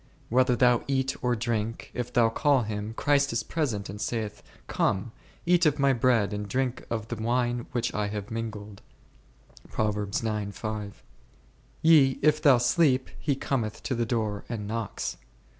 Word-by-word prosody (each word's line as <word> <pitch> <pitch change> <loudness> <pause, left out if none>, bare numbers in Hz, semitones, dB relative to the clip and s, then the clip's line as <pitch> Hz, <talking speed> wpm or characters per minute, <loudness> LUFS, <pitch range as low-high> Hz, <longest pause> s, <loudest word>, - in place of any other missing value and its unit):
Whether 125 +1 +3
thou 125 -1 +4
eat 135 0 0
or 125 -1 +2
drink, 115 0 -3
if 125 0 -4
thou 115 -2 +4
call 140 +2 +2
Him, 105 +1 -4
Christ 140 +1 +2
is 115 -1 0
present 120 -11 -2
and 100 +2 -7
saith, 105 -3 -3 0.2
Come, 100 +5 0 0.3
eat 175 -1 +4
of 150 - +2
My 140 -1 +3
bread 115 -4 +2
and 105 0 -4
drink 130 -1 -1
of 110 -1 -3
the 120 - -2
wine 120 +1 0
which 120 -1 -1
I 105 -1 -1
have 105 +1 -5
mingled; 105 -3 -6 1.0
yea, 105 +1 -1 1.8
if 155 0 +4
thou 140 -4 +6
sleep, 130 +1 +2
He 145 -2 0
cometh 120 -6 -2
to - - -2
the 120 -2 -1
door 110 -4 -1
and 110 -4 -4
knocks. 115 -1 -3
120 Hz, 150 wpm, -27 LUFS, 105-130 Hz, 1.8 s, thou